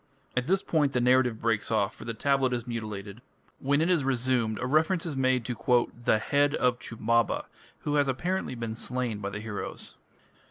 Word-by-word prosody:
At 125 Hz, +1 st, 0 dB
this 190 Hz, +1 st, +2 dB
point 145 Hz, -4 st, +1 dB
the 125 Hz, -, +2 dB
narrative 125 Hz, -2 st, +3 dB
breaks 110 Hz, -3 st, 0 dB
off, 105 Hz, -3 st, +1 dB
for -, -, -11 dB
the 115 Hz, 0 st, -4 dB
tablet 135 Hz, 0 st, +2 dB
is 120 Hz, -1 st, -2 dB
mutilated. 110 Hz, -2 st, -6 dB, 0.4 s
When 140 Hz, +2 st, +2 dB
it 165 Hz, -, +2 dB
is 165 Hz, -6 st, +2 dB
resumed 125 Hz, -4 st, +1 dB
a 125 Hz, -, -3 dB
reference 160 Hz, +6 st, +2 dB
is 160 Hz, -4 st, -3 dB
made 130 Hz, -2 st, +1 dB
to 120 Hz, 0 st, +2 dB, 0.2 s
"the -, -, +4 dB
head 145 Hz, +5 st, +2 dB
of 125 Hz, -1 st, +1 dB
Chumbaba", 115 Hz, 0 st, 0 dB, 0.4 s
who 145 Hz, -, -2 dB
has 145 Hz, -1 st, +3 dB
apparently 175 Hz, +3 st, -1 dB
been 115 Hz, -2 st, -4 dB
slain 120 Hz, -1 st, -2 dB
by 100 Hz, -1 st, -3 dB
the 105 Hz, +1 st, -5 dB
heroes. 105 Hz, -2 st, -6 dB
125 Hz, 190 wpm, -28 LUFS, 115-140 Hz, 0.4 s, the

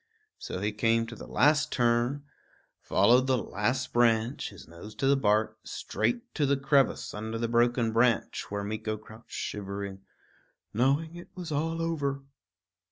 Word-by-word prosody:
So -, -, -5 dB
he 105 Hz, +1 st, 0 dB
came 115 Hz, +2 st, +2 dB
to 115 Hz, 0 st, -8 dB
the -, -, -10 dB
last 150 Hz, +2 st, +3 dB
turn, 120 Hz, +3 st, +1 dB, 0.6 s
followed 120 Hz, +7 st, +4 dB
the 130 Hz, -1 st, +3 dB
last 120 Hz, +4 st, -2 dB
branch, 115 Hz, +2 st, +2 dB
his -, -, -13 dB
nose 85 Hz, +6 st, -11 dB
to 135 Hz, -, -2 dB
the 140 Hz, +1 st, +5 dB
bark, 110 Hz, -4 st, +1 dB
straight 240 Hz, -1 st, -2 dB
to 145 Hz, -3 st, +1 dB
the 140 Hz, 0 st, +2 dB
crevice 140 Hz, 0 st, +2 dB
under 110 Hz, +2 st, -4 dB
the 115 Hz, +1 st, -1 dB
broken 120 Hz, -1 st, +2 dB
branch, 115 Hz, +1 st, +1 dB
where 100 Hz, 0 st, -3 dB
Meeko 110 Hz, +1 st, -3 dB
crouched 110 Hz, +2 st, -15 dB
shivering, 100 Hz, -1 st, -5 dB, 0.7 s
knowing 140 Hz, +8 st, +1 dB
it 175 Hz, -, -10 dB
was 175 Hz, -3 st, -6 dB
all 165 Hz, +3 st, -1 dB
over. 140 Hz, -4 st, -2 dB
120 Hz, 155 wpm, -29 LUFS, 110-140 Hz, 0.7 s, the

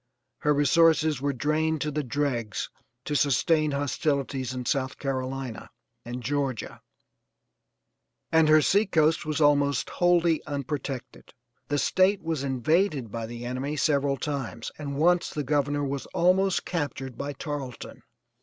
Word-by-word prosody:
Her 150 Hz, -, +2 dB
resources 155 Hz, 0 st, +3 dB
were 140 Hz, 0 st, +1 dB
drained 155 Hz, +3 st, 0 dB
to 150 Hz, -, -1 dB
the 150 Hz, +1 st, -1 dB
dregs 125 Hz, -5 st, -2 dB, 0.3 s
to 150 Hz, -, -2 dB
sustain 155 Hz, +2 st, +2 dB
hostilities 140 Hz, -2 st, -1 dB
in 125 Hz, -1 st, -5 dB
South 130 Hz, +1 st, -1 dB
Carolina 130 Hz, -3 st, -4 dB, 0.3 s
and 120 Hz, +1 st, -6 dB
Georgia, 135 Hz, -2 st, -2 dB, 1.5 s
and 160 Hz, -1 st, +4 dB
her 155 Hz, 0 st, +6 dB
sea 200 Hz, +6 st, +3 dB
coast 160 Hz, -3 st, +2 dB
was 155 Hz, -2 st, -1 dB
almost 145 Hz, -3 st, +2 dB
wholly 175 Hz, -2 st, +2 dB
unprotected. 140 Hz, -2 st, -5 dB, 0.3 s
The 145 Hz, -, 0 dB
State 190 Hz, +5 st, +2 dB
was 160 Hz, -4 st, -2 dB
invaded 140 Hz, -, +1 dB
by 115 Hz, 0 st, -4 dB
the 120 Hz, +1 st, -7 dB
enemy 130 Hz, +4 st, -3 dB
several 140 Hz, -2 st, +1 dB
times 135 Hz, -5 st, -4 dB
and 140 Hz, -2 st, -4 dB
once 175 Hz, +3 st, +3 dB
the 150 Hz, -, -3 dB
Governor 145 Hz, +1 st, 0 dB
was 140 Hz, -1 st, -3 dB
almost 185 Hz, +2 st, +3 dB
captured 140 Hz, -6 st, -3 dB
by 145 Hz, +3 st, -4 dB
Tarleton. 140 Hz, -3 st, -6 dB
145 Hz, 135 wpm, -27 LUFS, 130-155 Hz, 1.5 s, her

